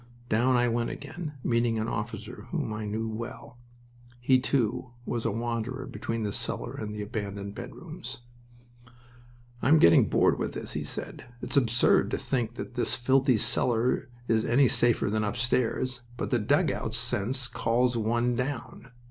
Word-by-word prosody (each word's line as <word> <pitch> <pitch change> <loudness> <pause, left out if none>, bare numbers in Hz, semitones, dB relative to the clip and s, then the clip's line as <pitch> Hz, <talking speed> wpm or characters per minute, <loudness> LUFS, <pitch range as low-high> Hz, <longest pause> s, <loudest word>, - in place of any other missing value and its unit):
Down 125 +4 +3
I 120 0 +3
went 115 0 0
again, 150 +2 -6
meeting 115 -1 +2
an 110 +1 -1
officer 110 +1 -5
whom 150 -11 -2
I 105 0 -4
knew 110 +2 -2
well. 120 +4 -7 0.6
He, 130 +1 +4
too, 125 -1 0
was 120 -1 -2
a 115 - +2
wanderer 120 +3 -3
between 115 -3 -4
the 105 -1 -2
cellar - - -3
and 105 -1 -5
the 105 0 -4
abandoned 100 -2 -5
bedrooms. 120 - -8 1.4
"I - - +1
am 155 +4 +7
getting 85 - +6
bored - - +3
with - - -2
this," - - -5
he - - -2
said. - - -6 0.2
"It's - - -3
absurd 120 -3 +4
to - - -1
think 120 -3 -2
that 125 - -6
this 120 - +1
filthy 130 0 +3
cellar 120 +3 +1 0.2
is 110 -1 +2
any 130 +4 +4
safer 120 -3 +3
than 110 0 +1
upstairs. 125 +3 0 0.2
But - - -3
the 120 - +3
dugout 105 - +1
sense 125 +5 0
calls 120 +2 +1
one 120 +2 +1
down. 125 -1 -4
120 Hz, 160 wpm, -28 LUFS, 110-125 Hz, 1.4 s, am